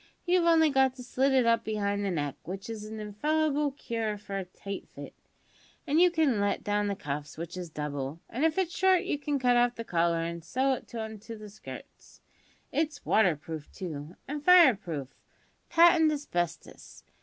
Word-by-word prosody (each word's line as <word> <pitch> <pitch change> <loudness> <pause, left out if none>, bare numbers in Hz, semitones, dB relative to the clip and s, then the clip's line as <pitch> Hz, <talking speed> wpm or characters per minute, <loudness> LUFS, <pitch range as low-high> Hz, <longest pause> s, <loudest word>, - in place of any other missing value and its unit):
You've 355 -1 +3
only 320 -2 +5
got 265 -1 +3
to 250 - -9
slit 265 +2 +1
it 260 -2 +4
up 230 0 +3
behind 205 -2 -1
to - - -2
the - - 0
neck, 145 -6 -2
which 195 +5 -7
is 215 -1 -7
a' 220 - -7
infallible 295 +7 0
cure 225 -6 -3
for 200 -1 -7
a 190 - -5
tight 195 +2 -8
fit, - - -10 0.7
an' 305 +1 +2
you 360 +1 +7
can 315 -10 +2
let 200 0 0
down 205 0 0
the 200 - -1
cuffs, 150 -3 -5
which 170 +1 -6
is 180 -2 -6
double, 150 -1 -4
an' 260 - -3
if 320 +1 +2
it's 360 -3 0
short 375 -1 +4
you 290 - -2
can 290 -1 -1
cut 250 -2 +3
off 245 0 +3
the 230 - -5
collar, 170 -4 +1
an' 170 0 -4
sew 260 +11 0
it 245 - -7
on 220 -1 -5
to 225 +2 -9
the 210 -1 -10
skirts. 210 - -12 0.5
It's 310 0 -2
water 190 -7 +4
proof, 155 0 -8
too, 160 -2 -7
and 295 +1 -5
fire 350 -5 +8
proof, 160 - -6 0.6
patent 335 -2 +6
asbestos. 175 - -4
220 Hz, 195 wpm, -29 LUFS, 175-290 Hz, 0.7 s, fire